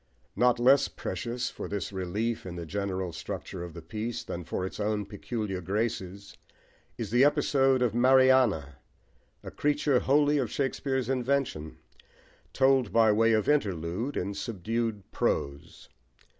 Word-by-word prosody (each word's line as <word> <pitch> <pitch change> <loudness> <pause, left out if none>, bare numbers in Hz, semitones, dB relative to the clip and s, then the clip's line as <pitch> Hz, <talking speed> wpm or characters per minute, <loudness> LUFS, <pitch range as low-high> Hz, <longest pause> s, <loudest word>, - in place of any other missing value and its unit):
Not 125 0 +3
less 130 +3 +5
precious 120 +1 -4
for - - -6
this 100 0 -4
relief 100 +5 -2
in 90 - -6
the 85 -1 -6
general 95 0 -3
structure 85 +2 -6
of 85 -2 -9
the 85 - -9
piece, 110 +7 -4
than 85 - -6
for 90 +3 -3
its 95 - -7
own 105 0 -1
peculiar 100 -1 -4
graces 100 0 -3 0.6
is 110 -4 -5
the 120 +2 +5
episode 135 -2 +3
of 120 -4 +1
Mariana, 125 - +4 0.7
a - - -8
creature 145 -2 +1
wholly 145 +2 +3
of 125 -5 -1
Shakespeare's 135 -2 -1
invention, 130 - -1 0.7
told, 130 -5 +3
by 110 0 +5
way 115 +2 +3
of 110 -2 +1
interlude, 100 - 0
in 100 +3 -2
subdued 110 +1 -3
prose. 70 0 -2
110 Hz, 140 wpm, -28 LUFS, 95-130 Hz, 0.7 s, less